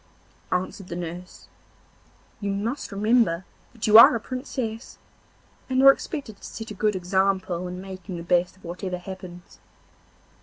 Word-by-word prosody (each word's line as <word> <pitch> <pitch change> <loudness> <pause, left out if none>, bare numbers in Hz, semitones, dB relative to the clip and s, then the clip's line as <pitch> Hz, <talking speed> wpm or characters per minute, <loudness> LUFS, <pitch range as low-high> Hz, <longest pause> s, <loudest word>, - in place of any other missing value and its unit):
answered 185 +1 -2
the 170 - -6
nurse, 175 +1 -7 0.9
'you 200 - -3
must 220 +7 -3
remember 200 -4 +2 0.3
that 230 -2 -5
you 215 +1 +9
are 230 - +9
a - - -1
Princess, 250 -2 -5 0.7
and 260 0 +2
are 275 - +11
expected 275 -7 -6
to - - -24
set 225 -1 -7
a - - -4
good 210 +1 0
example 185 -1 0
in 180 0 -6
making 185 -1 -8
the 170 - -6
best 180 +2 +1
of - - -25
whatever 180 +2 -4
happens. 180 -1 -10
190 Hz, 150 wpm, -25 LUFS, 180-220 Hz, 0.9 s, are